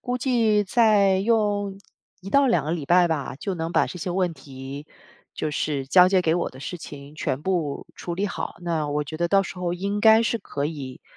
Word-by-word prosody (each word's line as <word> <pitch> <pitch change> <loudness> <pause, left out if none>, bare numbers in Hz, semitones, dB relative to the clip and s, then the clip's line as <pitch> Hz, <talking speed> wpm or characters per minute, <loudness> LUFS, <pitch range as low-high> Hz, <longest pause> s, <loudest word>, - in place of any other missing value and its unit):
估 250 0 -2
计 230 -5 +2
再 200 -3 +4
用， 205 -2 0 0.4
1 195 - -8
到 280 -1 +4
2 170 - +2
个 155 - -2
礼 155 -5 -4
拜 175 0 +5
吧， 145 -5 -2
就 195 +6 -4
能 165 -1 -3
把 - - +2
这 180 - -8
些 180 - -4
问 180 -1 0
题 135 +1 -9 0.5
就 155 - -2
是， 145 -2 -2
交 180 +5 +6
接 185 -1 +3
给 160 0 +2
我 175 - -1
的 130 - -14
事 175 +5 -6
情， 145 -1 -10
全 140 -2 -3
部 170 -7 -2
处 175 - -5
理 200 +3 -1
好。 - - -5
那 160 -4 -1
我 150 0 -1
觉 155 +2 -7
得 170 0 0
到 195 +1 +4
时 185 - -8
候 175 -1 -2
应 200 +3 -2
该 220 +1 +6
是 230 0 0
可 140 -7 -4
以， 140 -4 -6
175 Hz, 225 characters per minute, -24 LUFS, 150-200 Hz, 0.5 s, 交